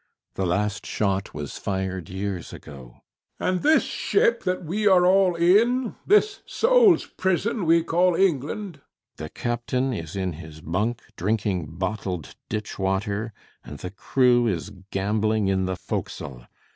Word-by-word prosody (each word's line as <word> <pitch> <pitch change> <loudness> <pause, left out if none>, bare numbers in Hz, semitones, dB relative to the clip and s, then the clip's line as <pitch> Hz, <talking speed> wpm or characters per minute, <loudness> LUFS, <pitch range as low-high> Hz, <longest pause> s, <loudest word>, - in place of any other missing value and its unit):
The 95 - -1
last 105 +3 -1
shot 100 -2 -1
was 75 -2 -6
fired 95 -3 -3
years 95 -1 -4
ago. 65 -5 -12 0.4
HECTOR. - - +1
And 185 - -1
this 310 +1 +4
ship 235 - +1
that 180 -1 -1
we 210 +6 0
are 185 -2 +6
all 185 -1 +4
in? 225 +8 +3
This 420 0 +3
soul's 470 -6 +4
prison 190 +1 -1
we 165 0 +5
call 175 +1 +2
England? 180 +2 0
CAPTAIN - - -28
SHOTOVER. - - -46
The 75 0 -6
captain 125 - -2
is 85 -4 -6
in 95 -2 -2
his 80 -1 -11
bunk, 105 +9 -2
drinking 95 -6 -2
bottled 95 -4 -4
ditch 105 -1 -4
water; 100 +3 -1 0.3
and 75 - -9
the 90 - -7
crew 120 +4 +2
is 95 -1 -2 0.2
gambling 105 +1 0
in 95 -1 +1
the 95 0 -2
forecastle. 65 -7 -5
110 Hz, 150 wpm, -24 LUFS, -, 0.4 s, are